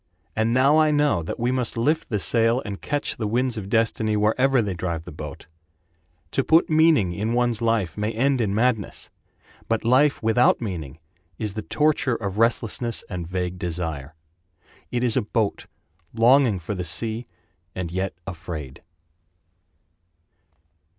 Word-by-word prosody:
And 110 +1 +1
now 135 +5 +4
I 155 -1 +4
know 145 - +2
that 80 - -5
we 120 +2 +1
must 125 -2 -2
lift 150 +8 0
the 105 - 0
sail 115 +4 +2
And 100 -2 -6
catch 145 0 -2
the 110 - -2
winds 125 +3 0
of 100 -3 -6
destiny 110 -1 +1
Wherever 125 +6 +3
they 105 -4 0
drive 85 -2 -4
the - - -8
boat. 75 -2 -8 0.9
To 135 - +1
put 160 +3 +3
meaning 155 - +4
in 110 +5 -2
one's 120 -2 +1
life 115 -8 0
may 105 +1 0
end 130 +3 +1
in 100 -3 0
madness, 115 -3 -1 0.6
But 115 -1 -1
life 135 +4 +3
without 115 +3 +4
meaning 85 - -5 0.4
is 105 -3 -3
the 110 - -4
torture 150 0 +1
Of 100 -2 -4
restlessness 115 0 0
and 90 -3 -4
vague 90 0 -3
desire— 80 -5 -4 0.7
It 125 0 -1
is 120 -3 +1
a - - +3
boat 110 -1 -2 0.5
longing 120 -1 +4
for 85 +3 -5
the 90 -2 -3
sea 110 +7 -1 0.5
and 90 -3 -4
yet 95 +2 -2
afraid. 80 -7 -7
110 Hz, 155 wpm, -24 LUFS, 95-125 Hz, 0.9 s, now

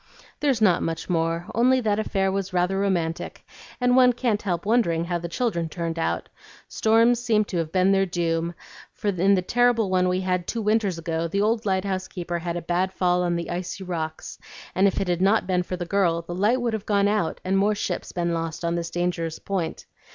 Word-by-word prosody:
"There's 265 -7 +1
not 180 -5 +4
much 165 +2 -3
more; 165 0 0
only 255 +3 +4
that 215 -2 +1
affair 195 -3 0
was 195 -1 -3
rather 180 +2 +1
romantic, 175 -5 -2 0.3
and 250 0 +3
one 250 -1 +6
can't 235 -4 0
help 175 -3 -2
wondering 200 -7 +2
how 175 0 -2
the 170 0 -6
children 170 -6 -1
turned 165 0 -4
out. - - -1 0.4
Storms 230 +2 +3
seem 220 -3 +2
to 185 - -4
have 165 -2 -2
been 185 +1 +3
their 195 0 +3
doom, 170 -1 -1 0.4
for 210 - -3
in 195 +1 +3
the 185 - 0
terrible 235 -1 +2
one 185 -1 +3
we 185 +1 0
had 180 -2 -1
two 230 -2 -2
winters 210 -4 +1
ago, 165 0 -2
the 200 +5 -1
old 220 0 0
lighthouse 190 -1 -1
keeper 175 -2 -4
had 170 0 -3
a 170 - -5
bad 180 +2 0
fall 180 -1 +1
on 175 -1 0
the 170 0 -4
icy 180 +2 -4
rocks, 160 -3 -5 0.3
and 190 +2 +4
if 195 - 0
it 195 - -1
had 175 0 0
not 200 +2 +3
been 180 -1 +1
for 180 +1 -4
the 175 - -4
girl, 170 -3 +1
the 175 - -6
light 210 +8 +2
would 240 -2 -1
have 215 -2 -4
gone 200 -1 +3
out 205 -5 0
and 190 +1 +2
more 210 +2 +2
ships 205 - -3
been 170 -1 -1
lost 165 0 -3
on 170 - 0
this 170 -1 -2
dangerous 170 -2 -2
point. 185 -5 -4
185 Hz, 215 wpm, -24 LUFS, 170-210 Hz, 0.4 s, one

